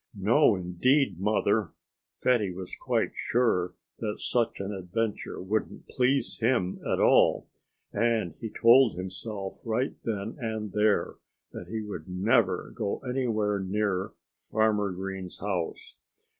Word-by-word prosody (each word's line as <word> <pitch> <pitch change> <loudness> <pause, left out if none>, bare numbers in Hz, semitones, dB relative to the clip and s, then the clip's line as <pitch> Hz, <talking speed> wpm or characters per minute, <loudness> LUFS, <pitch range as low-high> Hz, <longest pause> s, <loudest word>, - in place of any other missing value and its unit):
"No, 110 +5 +4
indeed, 95 - +1
Mother!" 105 -1 +1 0.4
Fatty 115 -7 +2
was 90 0 -7
quite - - 0
sure 90 -7 +1 0.2
that 105 -2 -3
such 120 -2 0
an 100 +1 -3
adventure 100 +4 -3
wouldn't 105 +4 -3
please 130 +2 +1
him 115 -6 +1
at - - +1
all. - - +4 0.5
And 110 -6 +1
he 115 - -4
told 120 +1 +5
himself 95 +2 -5
right 120 +4 -1
then 110 +1 -3
and 110 -3 -3
there 105 +1 +1 0.3
that 85 - -8
he 110 +3 -4
would 95 -6 -7
never 100 +3 +1
go 105 -4 -2
anywhere 110 -5 0
near 95 0 -1 0.4
Farmer 105 -2 +2
Green's 95 0 -6
house. 95 -4 -4
105 Hz, 125 wpm, -28 LUFS, 95-115 Hz, 0.5 s, told